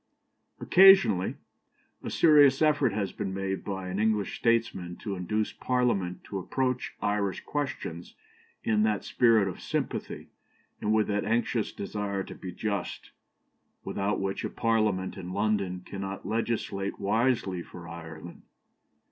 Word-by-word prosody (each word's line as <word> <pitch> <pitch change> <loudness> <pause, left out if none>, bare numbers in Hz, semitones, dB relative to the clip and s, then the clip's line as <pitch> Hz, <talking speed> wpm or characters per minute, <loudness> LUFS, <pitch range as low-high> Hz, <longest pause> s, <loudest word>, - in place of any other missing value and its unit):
Occasionally 185 - +6 0.7
a - - -5
serious 145 -4 +6
effort 145 -5 +3
has 100 -2 -2
been 95 -1 -4
made 95 0 -2
by 95 -2 -4
an 95 +2 -3
English 105 -2 +1
statesman 115 -7 0
to 105 - -5
induce 105 +4 -1
Parliament 120 -8 0
to 100 - -5
approach 125 +6 -2
Irish 100 -2 0
questions 130 - -4 0.5
in 110 -1 +2
that 105 -2 +1
spirit 115 -5 +3
of 95 - -5
sympathy, - - -3 0.5
and 105 - 0
with 110 -1 +3
that 105 0 -1
anxious 115 -1 0
desire 100 -1 -3
to - - -9
be 90 - -7
just, 100 +2 -4 0.7
without 100 +1 -1
which 95 0 -2
a - - -2
Parliament 110 -5 0
in 90 -1 -6
London 100 -3 0
cannot 100 0 -6
legislate 110 -3 -2
wisely 110 -4 +1
for 85 0 -11
Ireland. 85 0 -9
105 Hz, 130 wpm, -28 LUFS, 95-115 Hz, 0.7 s, Occasionally